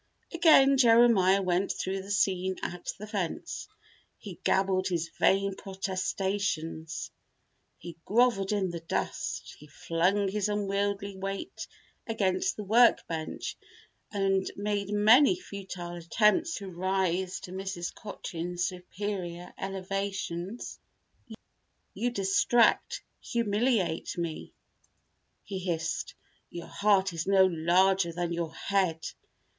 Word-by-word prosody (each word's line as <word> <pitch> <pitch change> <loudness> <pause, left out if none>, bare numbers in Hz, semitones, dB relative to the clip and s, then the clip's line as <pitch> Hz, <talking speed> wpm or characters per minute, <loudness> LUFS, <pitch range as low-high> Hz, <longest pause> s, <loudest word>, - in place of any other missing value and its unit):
Again 305 -5 +6
Jeremiah 225 -6 +5
went 185 +1 +1
through 190 +1 -3
the 195 - -11
scene 190 -2 +1
at 175 0 -4
the 210 - -7
fence. 200 -5 -4 0.5
He - - -10
gabbled 190 -1 +2
his 170 -3 -1
vain 195 0 +3
protestations. 190 -4 -3 0.7
He 170 -2 -10
groveled 220 -3 +2
in 195 -3 0
the 170 - -5
dust. 165 - -3
He 150 - -14
flung 180 +7 0
his 210 +1 -1
unwieldly 200 -1 -1
weight 195 - -5 0.4
against 220 - 0
the 210 - -6
work 230 +4 +5
bench 160 -1 -4 0.6
and 195 -2 +1
made 205 -1 -2
many 220 - +6
futile 190 - -7
attempts 210 - +2
to 195 -3 -7
rise 185 0 -1
to 180 - -9
Mrs. 190 -2 -4
Cochin's 175 -4 -5
superior 180 -1 -5
elevation. 195 0 -4 1.4
"You 245 - -1
distract, 215 +2 +2 0.2
humiliate 215 -7 0
me," 170 -2 -5 0.9
he 195 -2 -5
hissed. 165 -3 -3 0.3
"Your 170 - -7
heart 195 -2 +2
is 165 +1 -4
no 195 -1 +6
larger 180 +1 +3
than 170 0 -2
your 165 -1 -3
head. 185 -5 0
195 Hz, 110 wpm, -29 LUFS, 175-205 Hz, 1.4 s, Again